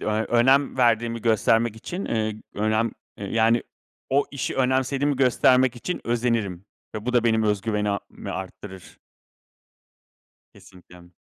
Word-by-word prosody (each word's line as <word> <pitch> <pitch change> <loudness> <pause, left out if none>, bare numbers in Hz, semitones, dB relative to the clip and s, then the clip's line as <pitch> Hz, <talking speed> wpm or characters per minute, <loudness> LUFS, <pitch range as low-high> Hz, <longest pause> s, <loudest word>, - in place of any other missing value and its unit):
eee, - - -6
önem 120 +6 +2
verdiğimi 115 -2 +1
göstermek 115 0 +2
için, 180 - -6
ııı, 110 -1 -1 0.2
önem, 110 +2 0 0.3
ııı, 100 - -5
yani 115 +1 +3 0.5
o 140 +2 +3
işi 140 - -4
önemsediğimi 130 +2 +1
göstermek 130 -1 +3
için 180 +9 -4
özenirim 115 -6 -1 0.3
ve 110 +2 -6
bu 125 - 0
da 120 -1 +2
benim 110 -1 +2
öz 105 -2 +1
güvenimi 105 -1 -3
arttırır. 95 0 -9 1.6
Kesinlikle. 90 -1 -17
115 Hz, 125 wpm, -24 LUFS, 105-125 Hz, 1.6 s, yani